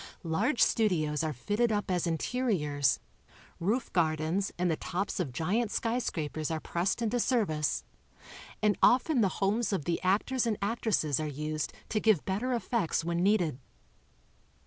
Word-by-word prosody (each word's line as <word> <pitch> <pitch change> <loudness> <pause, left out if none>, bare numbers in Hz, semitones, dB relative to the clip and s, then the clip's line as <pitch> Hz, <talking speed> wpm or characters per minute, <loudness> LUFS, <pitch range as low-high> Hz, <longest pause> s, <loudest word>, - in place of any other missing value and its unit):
Large 210 - +2
studios 160 -9 +1
are 155 - 0
fitted 205 - 0
up 205 -2 -1
as 180 -1 0
interiors, 160 - 0 0.6
roof 220 +8 -1
gardens 160 +3 +1
and 175 -1 +1
the - - +1
tops 190 +6 -3
of 160 -8 -1
giant 200 - 0
skj 235 +4 -1
scrapers 155 -5 -3
are 160 -1 -1
pressed 175 +8 -1
into 230 +2 0
service 195 - +1 0.8
and 210 -1 +4
often 255 +1 +4
the 195 - +3
homees 210 +4 +1
of 185 -8 -1
the 170 - -1
actors 225 +7 +1
and 215 -3 0
actresses 200 - 0
are 155 - -2
used 150 +1 -3 0.2
to 215 - +1
give 215 -8 +3
better 210 +7 -1
effects 230 -8 -1
when 170 0 0
needed. 180 -8 +2
190 Hz, 150 wpm, -30 LUFS, 155-225 Hz, 0.8 s, and